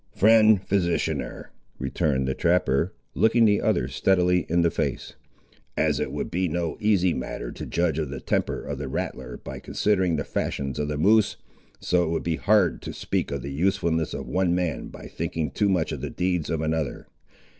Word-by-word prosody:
"Friend 110 Hz, 0 st, +6 dB
physicianer," 90 Hz, -3 st, -1 dB, 0.3 s
returned 65 Hz, -3 st, 0 dB
the 65 Hz, -, 0 dB
trapper, 85 Hz, 0 st, +1 dB, 0.2 s
looking 115 Hz, +1 st, +4 dB
the 105 Hz, -1 st, +3 dB
other 65 Hz, -, +1 dB
steadily 90 Hz, +4 st, +2 dB
in 85 Hz, +1 st, +3 dB
the 85 Hz, -, +3 dB
face, -, -, -3 dB, 0.6 s
"as -, -, +2 dB
it -, -, -2 dB
would -, -, -4 dB
be 90 Hz, +1 st, 0 dB
no 85 Hz, -1 st, -2 dB
easy 95 Hz, -5 st, +3 dB
matter -, -, -5 dB
to -, -, -7 dB
judge 85 Hz, -3 st, 0 dB
of 75 Hz, -3 st, -2 dB
the 70 Hz, -1 st, -5 dB
temper -, -, -1 dB
of 70 Hz, -2 st, -5 dB
the 70 Hz, -, -4 dB
rattler 65 Hz, -1 st, -4 dB
by -, -, -8 dB
considering 95 Hz, -5 st, +1 dB
the 75 Hz, -, -1 dB
fashions 70 Hz, 0 st, -3 dB
of 75 Hz, -, -1 dB
the 75 Hz, 0 st, -2 dB
moose, 105 Hz, +6 st, +3 dB, 0.4 s
so 90 Hz, -1 st, +2 dB
it 80 Hz, -, -1 dB
would 85 Hz, -, -1 dB
be 80 Hz, -2 st, -1 dB
hard 100 Hz, -4 st, +2 dB
to -, -, -6 dB
speak -, -, -2 dB
of 70 Hz, -3 st, -4 dB
the 70 Hz, -, -5 dB
usefulness 80 Hz, 0 st, 0 dB
of -, -, -6 dB
one 90 Hz, -2 st, +1 dB
man 90 Hz, -4 st, -2 dB
by -, -, -11 dB
thinking 80 Hz, -2 st, -3 dB
too 105 Hz, -, +1 dB
much 90 Hz, -5 st, +1 dB
of -, -, -5 dB
the -, -, -3 dB
deeds 90 Hz, -3 st, -1 dB
of 80 Hz, -2 st, -1 dB
another. 80 Hz, -1 st, -2 dB
85 Hz, 190 wpm, -25 LUFS, 75-95 Hz, 0.6 s, Friend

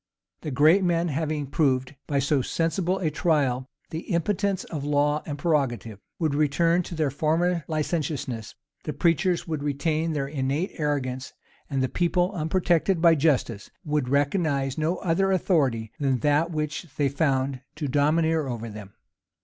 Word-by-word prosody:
The 155 Hz, -, -4 dB
great 155 Hz, +8 st, +4 dB
men, 170 Hz, -1 st, +1 dB
having 150 Hz, 0 st, -2 dB
proved 130 Hz, -2 st, +1 dB
by 145 Hz, -, 0 dB
so 140 Hz, 0 st, +2 dB
sensible 170 Hz, +6 st, 0 dB
a 165 Hz, -5 st, -1 dB
trial 135 Hz, -6 st, +1 dB, 0.2 s
the 160 Hz, -, -3 dB
impotence 195 Hz, +2 st, 0 dB
of 150 Hz, -4 st, -6 dB
law 145 Hz, +1 st, +1 dB
and 145 Hz, -2 st, -4 dB
prerogative, 135 Hz, -, -1 dB, 0.2 s
would 160 Hz, -4 st, 0 dB
return 165 Hz, +4 st, +2 dB
to 175 Hz, -, -7 dB
their 155 Hz, -4 st, 0 dB
former 165 Hz, +4 st, +1 dB
licentiousness: 150 Hz, -7 st, -3 dB, 0.3 s
the 150 Hz, -, -4 dB
preachers 170 Hz, +1 st, +1 dB
would 155 Hz, -3 st, -3 dB
retain 155 Hz, +3 st, -1 dB
their 140 Hz, -2 st, -1 dB
innate 140 Hz, +5 st, -1 dB
arrogance: 135 Hz, -4 st, -2 dB, 0.4 s
and 135 Hz, -2 st, 0 dB
the -, -, +2 dB
people, 175 Hz, +4 st, +1 dB
unprotected 175 Hz, +1 st, +1 dB
by 165 Hz, 0 st, +6 dB
justice, 135 Hz, -9 st, 0 dB, 0.2 s
would 150 Hz, -4 st, 0 dB
recognize 140 Hz, -1 st, +1 dB
no 160 Hz, +3 st, 0 dB
other 190 Hz, +3 st, +1 dB
authority 135 Hz, -, +1 dB
than 135 Hz, -4 st, +1 dB
that 150 Hz, +4 st, +2 dB
which 155 Hz, +1 st, -3 dB
they 145 Hz, -, +2 dB
found 135 Hz, -2 st, 0 dB
to 150 Hz, -1 st, -3 dB
domineer 155 Hz, +2 st, +2 dB
over 115 Hz, -2 st, -4 dB
them. 105 Hz, -2 st, -10 dB
150 Hz, 150 wpm, -25 LUFS, 135-165 Hz, 0.4 s, by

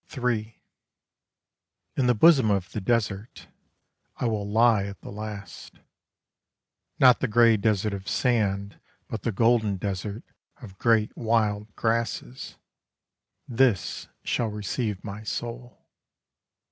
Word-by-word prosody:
III 115 Hz, -3 st, -2 dB, 1.4 s
In 130 Hz, -, +1 dB
the 125 Hz, -, +4 dB
bosom 135 Hz, -2 st, +6 dB
of 95 Hz, -2 st, 0 dB
the 110 Hz, -, -4 dB
desert 105 Hz, 0 st, -2 dB, 0.7 s
I -, -, -3 dB
will 105 Hz, -3 st, -1 dB
lie 110 Hz, -2 st, +4 dB
at 100 Hz, 0 st, -8 dB
the -, -, -9 dB
last. 105 Hz, -3 st, -8 dB, 1.2 s
Not 125 Hz, -2 st, +6 dB
the 135 Hz, -, 0 dB
grey 115 Hz, 0 st, +5 dB
desert 105 Hz, -1 st, 0 dB
of 100 Hz, 0 st, -6 dB
sand 100 Hz, -5 st, 0 dB, 0.3 s
But 110 Hz, -, -5 dB
the 115 Hz, -, -1 dB
golden 110 Hz, -1 st, +2 dB
desert 100 Hz, +3 st, -4 dB, 0.4 s
of 100 Hz, -8 st, -12 dB
great 115 Hz, -2 st, +2 dB
wild 110 Hz, -2 st, 0 dB
grasses, 115 Hz, -, -2 dB, 0.9 s
This 120 Hz, -7 st, +1 dB, 0.2 s
shall 120 Hz, -, 0 dB
receive 105 Hz, 0 st, -3 dB
my 105 Hz, 0 st, -7 dB
soul. 120 Hz, +2 st, -6 dB
110 Hz, 115 wpm, -26 LUFS, 100-115 Hz, 1.4 s, bosom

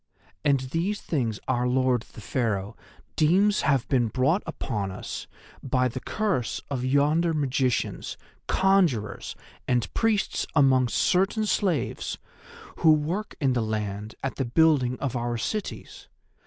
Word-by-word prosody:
And 140 Hz, -2 st, +3 dB
these 165 Hz, +10 st, -2 dB
things 115 Hz, -9 st, -2 dB
our 125 Hz, -1 st, +1 dB
Lord 130 Hz, -1 st, +2 dB
the -, -, -10 dB
Pharaoh 105 Hz, -2 st, -2 dB, 0.4 s
deems 195 Hz, +7 st, +3 dB
have 135 Hz, -4 st, +1 dB
been 125 Hz, -4 st, +2 dB
brought 135 Hz, -, +1 dB
upon 105 Hz, -11 st, -3 dB
us 95 Hz, -, -6 dB, 0.3 s
by 130 Hz, -1 st, +1 dB
the 130 Hz, +1 st, -5 dB
curse 195 Hz, -, -1 dB
of 130 Hz, -3 st, -2 dB
yonder 150 Hz, +5 st, +2 dB
magicians, 130 Hz, -4 st, -1 dB, 0.3 s
conjurers 180 Hz, -, +1 dB, 0.3 s
and 120 Hz, -3 st, 0 dB
priests 225 Hz, -3 st, 0 dB
among 130 Hz, -4 st, +5 dB
certain 190 Hz, -, +1 dB
slaves 185 Hz, -, -1 dB, 0.6 s
who 160 Hz, -, +5 dB
work 165 Hz, +8 st, 0 dB
in 135 Hz, -3 st, +2 dB
the 120 Hz, -, +1 dB
land 105 Hz, -1 st, -3 dB
at 135 Hz, -, -3 dB
the 135 Hz, -, 0 dB
building 130 Hz, -2 st, +3 dB
of 135 Hz, -3 st, -3 dB
our 120 Hz, 0 st, -1 dB
cities. 210 Hz, -, -5 dB
130 Hz, 130 wpm, -26 LUFS, 120-165 Hz, 0.6 s, among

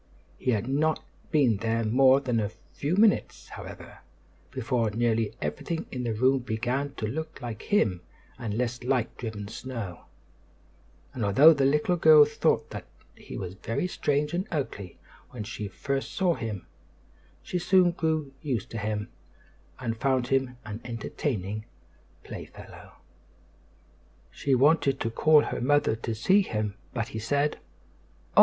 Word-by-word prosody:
He -, -, -2 dB
had 110 Hz, -1 st, +1 dB
not 150 Hz, -, +1 dB, 0.3 s
been 130 Hz, -9 st, +3 dB
there 115 Hz, +2 st, 0 dB
more 130 Hz, +4 st, +5 dB
than 125 Hz, -4 st, 0 dB
a 105 Hz, -, 0 dB
very 110 Hz, -, -15 dB
few 150 Hz, +5 st, -1 dB
minutes, 200 Hz, -, +2 dB
however, -, -, -10 dB, 0.5 s
before 120 Hz, -1 st, 0 dB
nearly 115 Hz, 0 st, 0 dB
everything 75 Hz, -, -3 dB
in 125 Hz, -, -4 dB
the 120 Hz, -2 st, -1 dB
room 130 Hz, +4 st, +3 dB
began 125 Hz, +4 st, -2 dB
to 110 Hz, -, -3 dB
look 155 Hz, +8 st, -4 dB
more 120 Hz, -, -5 dB
like 110 Hz, -, -9 dB
him 105 Hz, -, +1 dB, 0.4 s
and 110 Hz, -4 st, -3 dB
less 120 Hz, 0 st, -1 dB
like 125 Hz, -2 st, 0 dB
driven 110 Hz, -4 st, -5 dB
snow; 115 Hz, -6 st, -6 dB, 1.1 s
and 120 Hz, -, -3 dB
although 135 Hz, +11 st, +7 dB
the 140 Hz, -2 st, +1 dB
little 150 Hz, +5 st, +2 dB
girl 155 Hz, -2 st, +8 dB
thought 150 Hz, +1 st, 0 dB
that -, -, -7 dB, 0.3 s
he -, -, -9 dB
was 90 Hz, -2 st, -5 dB
very 115 Hz, -, -2 dB
strange 150 Hz, -3 st, 0 dB
and 185 Hz, +4 st, -1 dB
ugly 115 Hz, -, -4 dB, 0.3 s
when 115 Hz, -4 st, -6 dB
she 105 Hz, 0 st, -5 dB
first 135 Hz, +7 st, -3 dB
saw 185 Hz, -2 st, +3 dB
him, 110 Hz, -, -5 dB, 0.8 s
she 180 Hz, -, -2 dB
soon 180 Hz, 0 st, +4 dB
grew 160 Hz, -5 st, -1 dB
used 130 Hz, -, -3 dB
to 115 Hz, -, -4 dB
him, 105 Hz, 0 st, -2 dB, 0.7 s
and 115 Hz, -3 st, -3 dB
found 130 Hz, -2 st, +1 dB
him 130 Hz, -2 st, +1 dB
an 105 Hz, +2 st, -6 dB
entertaining 110 Hz, -, -3 dB, 0.6 s
playfellow. -, -, -10 dB, 1.4 s
She 135 Hz, -2 st, +1 dB
wanted 140 Hz, 0 st, +3 dB
to 115 Hz, -, -1 dB
call 150 Hz, +4 st, +5 dB
her -, -, -3 dB
mother 145 Hz, -2 st, +3 dB
to 115 Hz, 0 st, -3 dB
see 190 Hz, -, +4 dB
him; 105 Hz, -, -2 dB, 0.2 s
but 115 Hz, -2 st, -3 dB
he 110 Hz, -, -5 dB
said: 145 Hz, +6 st, 0 dB, 0.8 s
"Oh! -, -, +7 dB
125 Hz, 150 wpm, -27 LUFS, 110-145 Hz, 1.4 s, girl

